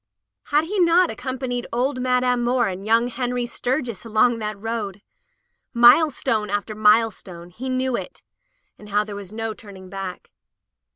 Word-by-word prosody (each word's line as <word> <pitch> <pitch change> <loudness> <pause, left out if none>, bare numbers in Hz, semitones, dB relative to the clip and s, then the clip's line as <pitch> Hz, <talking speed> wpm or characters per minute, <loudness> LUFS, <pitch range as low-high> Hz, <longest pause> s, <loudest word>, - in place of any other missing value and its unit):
Had 295 +1 +2
he 390 +5 -3
not 345 0 +4
ac - - -9
companied 255 -1 -4
old 255 +2 -1
Madame 250 -1 +1
Moore 240 0 +2
and 190 0 -5
young 230 +2 +3
Henry 245 0 -2
Sturgis 245 -2 -3
along 230 +1 +2
that 210 -1 -4
road? 210 -2 -4 0.7
Milestone 240 -3 +4
after 205 +2 -2
milestone, 210 -5 +1
he 255 +8 -6
knew 255 -1 0
it, - - -7 0.6
and 210 - -13
how 205 +1 +2
there 210 -1 -8
was 200 -2 -9
no 225 0 -4
turning 190 -4 -13
back. 195 -2 -7
230 Hz, 155 wpm, -22 LUFS, 210-255 Hz, 0.7 s, not